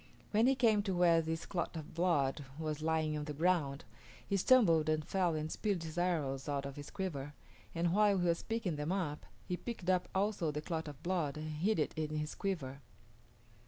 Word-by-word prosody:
When 220 +3 +4
he 270 - +4
came 225 -5 +4
to 195 -2 -2
where 170 -2 +5
this 165 +1 -3
clot 175 -2 -3
of 155 -2 -7
blood 155 -5 +1
was 155 -1 -3
lying 160 -1 +1
on 150 -1 -3
the 150 -1 -5
ground, 160 -3 +1 0.4
he 200 - 0
stumbled 180 -8 +5
and 155 -1 +1
fell 180 -4 +1
and 155 +1 -3
spilled 200 -6 -1
his 160 0 -6
arrows 155 -6 0
out 140 -1 -1
of 140 -1 -6
his 145 -1 -8
quiver, 145 -7 -4 0.4
and 170 +1 +1
while 205 -1 +4
he 180 - +1
was 170 -1 +2
picking 225 -8 -2
them 150 +3 -2
up 170 -6 -2 0.2
he 180 - -1
picked 190 -6 -2
up 180 -1 +1
also 195 -4 +1
the 150 0 -2
clot 160 0 -3
of 145 -2 -9
blood 170 -6 -1
and 155 0 -4
hid 180 +9 +1
it 150 - 0
in 155 -1 -2
his 150 0 -2
quiver. 140 -9 -3
165 Hz, 205 wpm, -34 LUFS, 150-185 Hz, 0.4 s, where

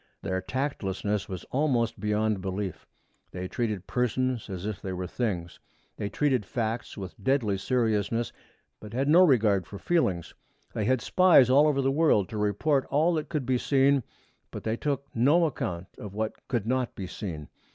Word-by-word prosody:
Their 95 0 -1
tactlessness 105 -5 -2
was 95 -2 -5
almost 125 -6 +1
beyond 105 -1 0
belief. 95 -1 -4 0.4
They 90 0 -5
treated 105 -3 -2
persons 125 -1 -1
as 95 -1 -5
if 105 -3 -4
they 95 - -4
were 90 0 -3
things. 90 -4 -3 0.4
They 100 - -3
treated 130 -1 +1
facts 115 +3 -3
with 95 -2 -8
deadly 110 -6 +1
seriousness, 115 -1 0 0.5
but 105 0 -10
had 135 +3 0
no 165 +5 +7
regard 105 - +3
for 100 - -8
feelings. 95 - 0 0.4
They 105 - -1
had 130 +1 +2
spies 160 - +5
all 145 +3 +6
over 140 -2 +1
the 135 - +2
world 140 - +3
to 110 - -5
report 130 +8 +1
all 155 +5 +3
that 155 -2 -2
could 150 -4 -2
be 125 0 +1
seen, 140 +1 +3 0.5
but - - -8
they 110 0 0
took 140 +1 -2
no 145 +9 +4
account 90 - -3
of 100 -1 -8
what 110 0 -4
could 120 -6 -1
not 125 +1 -1
be 95 - -5
seen. 85 -5 -6
115 Hz, 170 wpm, -28 LUFS, 100-135 Hz, 0.5 s, no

